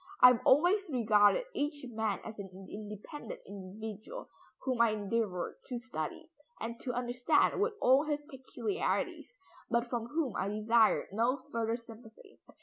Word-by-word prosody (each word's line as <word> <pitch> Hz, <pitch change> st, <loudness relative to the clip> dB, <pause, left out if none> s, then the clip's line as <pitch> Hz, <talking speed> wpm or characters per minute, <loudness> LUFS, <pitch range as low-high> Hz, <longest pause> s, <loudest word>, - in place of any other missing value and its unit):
I 250 Hz, -, +11 dB
have 250 Hz, -1 st, +2 dB
always 355 Hz, +7 st, +4 dB
regarded 225 Hz, -, +4 dB
each 290 Hz, -1 st, -2 dB
man 220 Hz, -2 st, -1 dB
as 220 Hz, -1 st, -8 dB
an 195 Hz, -1 st, -6 dB, 0.2 s
independent 215 Hz, -, -7 dB
individual, 210 Hz, -, -8 dB, 0.3 s
whom 255 Hz, -3 st, +1 dB
I 235 Hz, -, +6 dB
endeavored 205 Hz, -3 st, -2 dB
to 250 Hz, -, -3 dB
study, 195 Hz, -11 st, -5 dB, 0.3 s
and 230 Hz, +1 st, -5 dB
to 250 Hz, -, -3 dB
understand 245 Hz, +9 st, +2 dB
with 435 Hz, +2 st, +2 dB
all 265 Hz, +4 st, +5 dB
his 295 Hz, -1 st, -1 dB
peculiarities, 290 Hz, -, -3 dB, 0.4 s
but 235 Hz, 0 st, 0 dB
from 235 Hz, -2 st, -2 dB
whom 290 Hz, -4 st, -1 dB
I 190 Hz, -, -1 dB
desired 215 Hz, +2 st, +3 dB
no 235 Hz, +6 st, +1 dB
further 230 Hz, 0 st, 0 dB
sympathy. 225 Hz, -1 st, -15 dB
235 Hz, 145 wpm, -32 LUFS, 215-270 Hz, 0.4 s, I